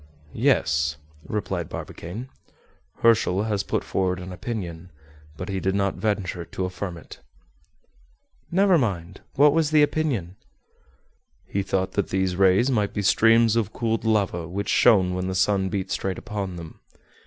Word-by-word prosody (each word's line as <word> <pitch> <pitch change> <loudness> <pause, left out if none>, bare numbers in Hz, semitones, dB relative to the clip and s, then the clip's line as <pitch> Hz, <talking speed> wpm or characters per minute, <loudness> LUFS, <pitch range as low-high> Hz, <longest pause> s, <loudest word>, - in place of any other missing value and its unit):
"Yes," 80 -1 +1 0.3
replied 95 -5 -3
Barbicane; 100 +10 -7 0.8
"Herschel 110 -4 +4
has 105 -3 0
put - - -2
forward 90 -1 -1
an 90 +1 -8
opinion, 90 -4 -6 0.5
but 90 - -5
he 95 -1 -2
did 95 +1 0
not 100 -1 +1
venture 95 -3 -2
to 95 +2 -4
affirm 90 -1 -5
it." 85 - -12 1.3
"Never 190 -1 +4
mind. 95 -6 -3
What 145 +1 +6
was 160 -2 +2
the 155 -1 +5
opinion?" 130 - -1 1.1
"He 100 - -2
thought 95 0 -1
that 100 -1 -1
these 95 -1 0
rays 95 +7 +4
might 105 -5 0
be 105 - -1
streams 115 +2 +4
of 110 -2 0
cooled 115 -2 -1
lava 100 -7 0
which 100 +4 -4
shone 95 -6 +4
when 90 0 -2
the 95 - -3
sun 95 0 +2
beat 95 -2 -3
straight 95 -2 -2
upon 100 -3 -5
them. 85 -2 -10
95 Hz, 150 wpm, -24 LUFS, 90-110 Hz, 1.3 s, What